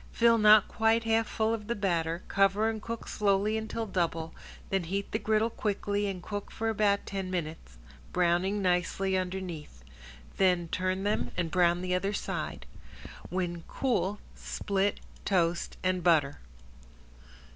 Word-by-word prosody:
Fill 230 -1 +4
not 210 -1 +7
quite 225 +1 +2
half 225 0 +2
full 220 0 0
of 210 -2 -4
the 235 - -1
batter, 170 -4 -1
cover 200 +2 +3
and 220 -1 -2
cook 230 +1 -6
slowly 205 +1 +1
until 220 +1 -3
double, 165 -4 -2 0.4
then 195 -3 +1
heat 195 +4 -3
the 215 - 0
griddle 220 +1 +1
quickly 205 -1 -1
and 185 -3 -5
cook 205 +1 -5
for 225 0 -2
about 205 -2 +2
ten 195 -2 -4
minutes, 160 - -5 0.3
browning 180 +3 +1
nicely 185 +1 +1
underneath. 180 - -4 0.5
Then 180 -3 +2
turn 185 +2 -1
them 205 +1 0
and 170 -3 -1
brown 175 0 +3
the 180 0 -1
other 195 +3 0
side. - - -4 0.6
When 175 -2 -2
cool 210 -6 0 0.2
split, 200 0 -1 0.2
toast 175 -3 0
and 185 -1 0
butter. 150 -5 +3
195 Hz, 145 wpm, -29 LUFS, 175-210 Hz, 0.6 s, not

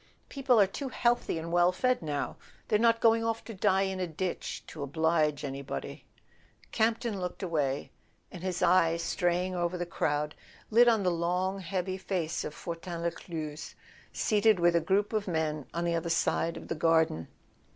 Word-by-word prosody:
People 260 -4 +2
are 200 - +7
too 265 +8 -5
healthy 240 -7 +1
and 165 +1 -5
well 175 +1 +4
fed 255 +6 +1
now; 145 -3 -3 0.3
they're 210 -2 +2
not 230 0 +3
going 225 0 +4
off 225 0 -1
to 225 - -7
die 195 -1 +2
in 190 -1 -2
a 180 - -1
ditch 175 +3 -4
to 155 - -9
oblige 155 +1 +1
anybody." 135 0 -6 0.7
Campton 225 -2 0
looked 180 +2 -5
away, 145 -6 -1 0.4
and 180 - -9
his 185 -1 -2
eye, 165 -2 +4
straying 175 +2 0
over 175 0 -1
the 175 - -2
crowd, 150 -3 -1 0.4
lit 240 +3 +6
on 225 -4 +4
the 180 - +2
long 180 +3 -1
heavy 185 0 -3
face 175 -4 -2
of 150 - -6
Fortin 170 0 -6
Lescluze, 165 -2 -5 0.4
seated 215 -2 +3
with 175 0 +4
a 170 - +4
group 200 +6 +1
of 215 -2 -1
men 155 -4 -1
on 170 +2 -2
the 170 - +1
other 170 0 -1
side 165 0 +1
of - - -9
the - - -2
garden. 160 - +2
175 Hz, 175 wpm, -30 LUFS, 165-200 Hz, 0.7 s, are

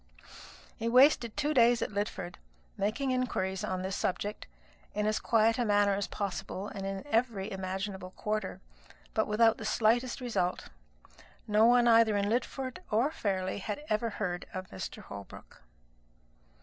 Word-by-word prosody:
He 230 0 -1
wasted 250 -2 +5
two 300 +1 +1
days 240 -3 +5
at - - -4
Lidford, 200 -3 -4 0.4
making 235 +7 -1
inquiries 190 -7 -1
on 185 0 -2
this 190 0 -2
subject, 205 +3 -2 0.5
in 210 0 0
as 215 0 +1
quiet 225 +1 +3
a - - +3
manner 205 -2 +3
as 200 0 -1
possible 200 0 -4
and 195 -1 -5
in 195 +5 -4
every 225 -6 0
imaginable 190 0 -4
quarter; 210 +1 -3 0.5
but - - +1
without 225 +1 +4
the - - -6
slightest 235 +4 +2
result. 225 -8 -2 0.8
No 215 +1 +5
one 240 0 +5
either 225 -2 +5
at 200 - +1
Lidford 255 - -2
or 235 +8 +2
Fairleigh 190 -8 -2
had 210 +8 -5
ever 215 +2 +1
heard 180 -5 -3
of 185 0 -6
Mr. 95 - -6
Holbrook. 100 -1 -11
210 Hz, 150 wpm, -31 LUFS, 195-235 Hz, 0.8 s, wasted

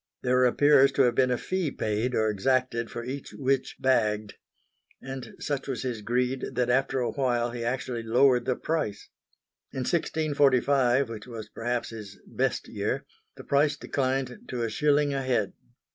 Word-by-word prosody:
There 125 0 +3
appears 140 +2 +5
to 140 - +4
have 120 -2 +3
been 130 +1 +3
a 125 - +1
fee 185 +1 -2
paid 110 +1 -1
or 110 - +2
exacted 115 +2 0
for 120 - -6
each 135 +3 -6
witch 135 -1 0
"bagged"; 105 -5 +1 0.7
and 135 -1 -8
such 140 -2 -3
was 135 -2 -3
his 120 -4 -3
greed 125 +4 -1
that 125 -1 +1
after 135 0 +1
a 120 - -1
while 120 -3 0
he 120 -1 -5
actually 125 0 -2
lowered 125 +2 +3
the 130 -1 +1
price. 155 -11 -3 0.6
In 130 - -4
1645, 140 -4 +2
which 115 0 -8
was 115 -3 -8
perhaps 120 +1 -3
his 105 -3 -9
"best" - - -1
year, - - -2 0.3
the - - -10
price 145 +1 +2
declined 135 +4 -2
to 120 - -3
a 115 - -2
shilling 145 +2 +2
a 135 - -1
head. 120 -6 0
125 Hz, 165 wpm, -27 LUFS, 120-135 Hz, 0.7 s, appears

